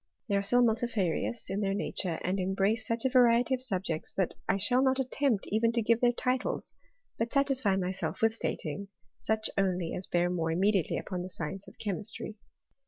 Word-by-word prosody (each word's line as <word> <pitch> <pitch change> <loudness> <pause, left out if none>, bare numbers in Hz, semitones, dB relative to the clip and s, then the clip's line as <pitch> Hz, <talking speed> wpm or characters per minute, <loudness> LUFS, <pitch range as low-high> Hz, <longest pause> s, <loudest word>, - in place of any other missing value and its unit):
They 200 - +1
are 200 - +3
so 245 +5 +3
multifarious 225 -2 0
in 195 +2 -2
their 195 -1 0
nature, 185 -4 -2
and 190 +2 0
embrace 195 +4 0
^ch 230 +2 0
a - - +4
variety 245 0 +5
of 255 - -1
subjects, 185 -9 -1
that 190 -3 0 0.2
I 195 - +3
shall 245 +6 +3
not 265 0 +3
attempt 260 -4 +1
even 225 +2 +3
to 235 - +1
give 230 +1 +2
their 245 -1 +5
titles, 255 +1 -2 0.5
but 230 +1 -1
satisfy 265 -8 +2
myself 185 0 -2
with 225 0 +3
stating 185 -4 -4 0.3
such 220 0 0
only 180 -3 0
as 185 - -4
bear 175 0 +1
more 165 -2 -1
immediately 190 +1 +2
upon 180 -3 -4
the 180 - -6
science 190 +3 -5
of - - -14
chemistry. 210 +1 -4
205 Hz, 185 wpm, -30 LUFS, 185-235 Hz, 0.5 s, variety